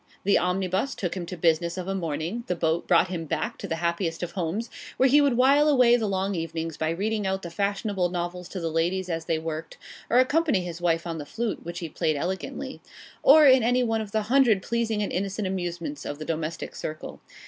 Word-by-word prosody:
The 200 - +4
omnibus 185 +6 -1
took 180 -2 -3
him 175 -2 -5
to 180 - -6
business 170 +1 +1
of 185 0 -4
a 195 - -1
morning; 170 +5 -3
the 180 - 0
boat 165 0 0
brought 175 +1 +4
him 170 -3 -4
back - - -3
to - - -5
the 165 - -1
happiest 170 0 -2
of 175 - -4
homes, 195 +6 -3 0.3
where 265 - +5
he 290 +3 +6
would 275 -4 +2
while 280 +4 +5
away 250 -4 +5
the 225 -3 0
long 195 0 -1
evenings 165 -2 -3
by 160 +1 -1
reading 205 +4 -1
out 190 0 -2
the 170 - -6
fashionable 200 -1 -1
novels 175 0 -4
to 190 - -5
the 165 -2 -2
ladies 175 +3 0
as 165 -1 -3
they 165 - 0
worked; 160 0 -5 0.3
or 240 - +3
accompany 280 - +3
his 175 -1 -6
wife 165 -1 +1
on 165 -2 -4
the - - -4
flute 230 +3 -3
(which 170 +1 -6
he 170 - -3
played 155 0 -1
elegantly); 180 +6 -4 0.4
or 300 +2 +8
in 260 -2 +7
any 245 +2 +2
one 225 -2 0
of 210 -2 -7
the 215 0 0
hundred 235 -4 +3
pleasing 225 -2 -1
and - - -3
innocent 195 +2 -2
amusements 175 -5 -4
of 145 - -5
the 155 - -7
domestic 160 0 -4
circle. 155 0 -6
185 Hz, 225 wpm, -26 LUFS, 165-220 Hz, 0.4 s, or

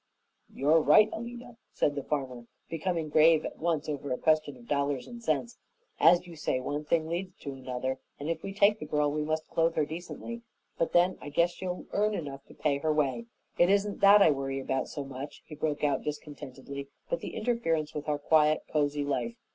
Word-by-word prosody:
"You're 150 +4 +3
right, 210 +9 +6
Alida," 240 +1 -7 0.2
said 145 - +1
the 140 - -3
farmer, 130 -5 -4 0.2
becoming 165 0 -1
grave 155 +1 +5
at - - -6
once 165 -2 0
over 145 -2 -4
a 125 - 0
question 155 -3 +1
of 120 -1 -16
dollars 140 -2 0
and 240 -1 -9
cents. 140 - -1 0.4
"As 175 +1 +6
you 175 -2 -10
say, 150 -4 -1
one 145 +4 -3
thing 160 +1 +1
leads 180 +2 -4
to 140 - -5
another, 130 0 -4 0.2
and 145 - -5
if 165 -1 -2
we 195 - -5
take 200 +2 +4
the 155 - -6
girl 150 -1 +1
we 150 +1 -1
must 155 +1 -2
clothe 165 0 +1
her 155 - +2
decently. 175 +9 -7 0.3
But 165 - -1
then, 180 +2 +3
I 145 - -7
guess 170 +4 +2
she'll 180 0 -5
earn 210 +1 +1
enough 140 -5 -6
to - - -15
pay 140 -2 0
her 155 +1 +1
way. 150 - 0 0.3
It 175 - +6
isn't 200 +1 +1
that 200 0 +8
I 160 - +6
worry 135 -1 -2
about 135 0 -1
so 145 - -5
much," 135 +2 -8
he - - -11
broke 150 0 -2
out 145 -1 +2
discontentedly, 140 -2 -7 0.2
"but - - -1
the - - -7
interference 165 -11 0
with 150 0 -4
our 150 - +1
quiet, 155 +1 +3
cozy 145 -1 +1
life. 145 - -2
155 Hz, 205 wpm, -29 LUFS, 140-175 Hz, 0.4 s, that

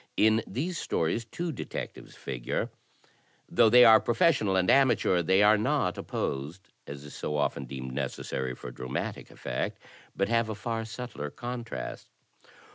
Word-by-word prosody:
In 110 +1 +4
these 160 - -3
stories 85 +8 -1
two 170 +9 -4
detectives 135 - -7
figure. - - -3 0.8
Though 115 -2 +5
they 125 +2 +8
are 110 -1 +9
professional 120 - +2
and 90 -1 +2
amateur, 120 -9 +4
they 95 +4 +4
are 105 0 +6
not 110 - +1
opposed, 75 +8 -4 0.2
as 70 0 -8
is 75 - -10
so 75 - -3
often 75 - -1
deemed 65 -1 -6
necessary 65 -1 -3
for 60 - -8
dramatic 65 +1 -5
effect, - - -4 0.4
but 100 - +1
have 115 0 +1
a 110 - -3
far 115 +1 -3
subtler 115 -9 -6
contrast. 120 +4 -6
105 Hz, 145 wpm, -29 LUFS, 75-120 Hz, 0.8 s, are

